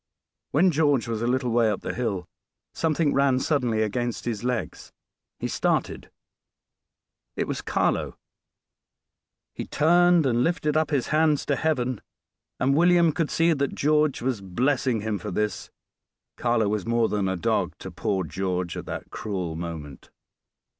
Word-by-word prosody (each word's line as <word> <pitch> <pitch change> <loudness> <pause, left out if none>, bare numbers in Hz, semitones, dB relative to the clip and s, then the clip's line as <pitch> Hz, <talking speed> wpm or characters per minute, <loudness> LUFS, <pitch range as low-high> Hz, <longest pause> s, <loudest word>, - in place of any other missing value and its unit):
When 175 +5 +4
George 145 -5 +2
was 115 -1 -3
a 120 - 0
little 125 0 0
way 115 -1 +3
up 105 - -2
the - - -4
hill, 100 -8 -2 0.5
something 160 -2 +1
ran 135 -2 +3
suddenly 125 -7 +1
against 120 +2 -2
his 115 -2 -3
legs 125 -1 -3 0.5
he - - -3
started - - -1 1.3
it - - -2
was - - -3
Carlo. - - 0 1.4
He - - -6
turned 175 +1 +4
and 120 -2 +2
lifted 155 -2 0
up 155 0 +2
his 140 -6 0
hands 155 -1 +2
to 140 - +1
Heaven; 130 -7 -1 0.6
and 135 +2 +2
William 170 0 +5
could 160 0 -1
see 165 0 +3
that 140 -2 -1
George 150 -3 +2
was 125 -5 -1
blessing 120 +4 0
him 105 -1 -2
for - - -6
this. 105 0 -2 0.7
Carlo 120 -3 +1
was 105 -1 -2
more 115 -1 +2
than 100 -2 -1
a 95 - -1
dog 85 - 0
to - - -8
poor 95 -2 -1
George 90 +1 -3
at - - -7
that - - -6
cruel 90 -6 -4
moment. 80 -5 -7
125 Hz, 155 wpm, -25 LUFS, 105-150 Hz, 1.4 s, William